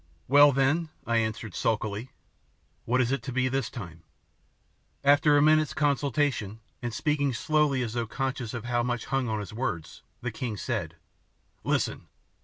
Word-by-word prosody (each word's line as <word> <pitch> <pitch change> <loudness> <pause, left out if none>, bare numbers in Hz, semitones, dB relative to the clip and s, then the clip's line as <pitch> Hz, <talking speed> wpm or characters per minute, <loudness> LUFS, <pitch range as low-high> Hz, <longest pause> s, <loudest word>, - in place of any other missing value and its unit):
"Well, 145 +2 +7
then," 140 +5 +1 0.2
I 115 0 +1
answered 110 -2 -2
sulkily, 110 +2 -1 0.8
"what 125 +2 +2
is 125 0 +1
it 135 -2 0
to 120 - -6
be 130 0 +1
this 135 +1 -1
time?" 85 -9 -8 1.0
After 145 +1 +5
a 145 - +5
minute's 155 -1 +4
consultation, 140 -7 0 0.2
and 120 -1 -3
speaking 140 +3 0
slowly 150 -2 +1
as 115 -2 -4
though 120 -1 -2
conscious 130 0 -3
of 120 -1 -5
how 120 0 +1
much 120 0 -2
hung 135 -3 -1
on 110 -1 -1
his 105 0 -7
words, 110 -9 -4 0.2
the 125 - -3
king 115 -1 -4
said, 100 -11 -3 0.7
"Listen! - - -1
125 Hz, 160 wpm, -28 LUFS, 115-140 Hz, 1.0 s, Well